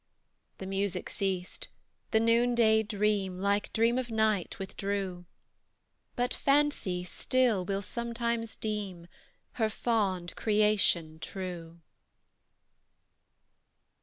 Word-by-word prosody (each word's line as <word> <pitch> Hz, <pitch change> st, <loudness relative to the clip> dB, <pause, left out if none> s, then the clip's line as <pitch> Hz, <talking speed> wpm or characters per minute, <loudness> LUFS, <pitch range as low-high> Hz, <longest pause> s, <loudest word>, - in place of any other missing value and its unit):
The 190 Hz, -, -7 dB
music 195 Hz, 0 st, -2 dB
ceased; 185 Hz, -2 st, -2 dB, 0.4 s
the 220 Hz, -, +3 dB
noonday 230 Hz, -1 st, +4 dB
dream, 205 Hz, -3 st, 0 dB
Like 200 Hz, +1 st, +1 dB
dream 230 Hz, +2 st, +3 dB
of 250 Hz, -2 st, -4 dB
night, 220 Hz, -4 st, +1 dB
withdrew; 195 Hz, -2 st, -3 dB, 0.9 s
But 245 Hz, 0 st, 0 dB
Fancy, 275 Hz, -11 st, +1 dB
still, 230 Hz, +2 st, +1 dB
will 195 Hz, +1 st, -2 dB
sometimes 235 Hz, 0 st, -2 dB
deem 205 Hz, -5 st, -4 dB, 0.6 s
Her 220 Hz, -, +3 dB
fond 195 Hz, -7 st, -1 dB
creation 205 Hz, -7 st, +2 dB
true. 170 Hz, -3 st, -6 dB
205 Hz, 90 wpm, -30 LUFS, 185-230 Hz, 0.9 s, noonday